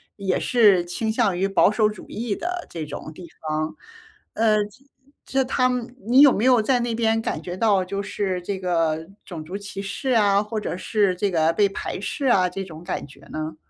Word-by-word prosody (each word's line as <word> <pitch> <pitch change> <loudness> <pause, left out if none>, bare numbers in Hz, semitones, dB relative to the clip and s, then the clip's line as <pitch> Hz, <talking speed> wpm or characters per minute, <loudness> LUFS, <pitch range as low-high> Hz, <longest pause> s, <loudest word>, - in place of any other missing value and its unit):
也 195 -2 -1
是 210 -7 +4
倾 220 +6 -2
向 210 -6 +1
于 195 - +1
保 195 0 +4
守 215 0 +2
主 210 - -8
义 220 -2 -3
的 355 +1 -4
这 165 -2 -5
种 150 +1 -7
地 170 +1 -11
方。 155 0 -3 0.6
呃， 215 -2 +2
这 210 +6 -16 0.4
这 265 0 0
他 255 0 +2
们 250 -1 -3
你 255 +4 +6
有 285 -3 +8
没 215 - -1
有 255 -2 +5
在 245 +3 +2
那 235 -1 -1
边 225 -1 +1
感 - - -2
觉 175 0 -6
到， 200 -3 +2
就 200 +2 -3
是 195 -2 -2
这 195 +2 -3
个 165 -3 0 0.2
种 160 -4 -8
族 180 +5 -7
歧 200 -1 -7
视 200 +7 -4
啊， 205 -5 +4
或 215 +1 -4
者 210 - -4
是 200 0 +1
这 200 +2 0
个 165 -2 +2
被 200 +3 +3
排 195 - -5
斥 275 +7 -4
啊， 190 -8 +4
这 195 +2 -5
种 165 -3 -10
感 180 - -4
觉 140 -1 -16
呢？ 155 0 -4
200 Hz, 230 characters per minute, -23 LUFS, 180-225 Hz, 0.6 s, 有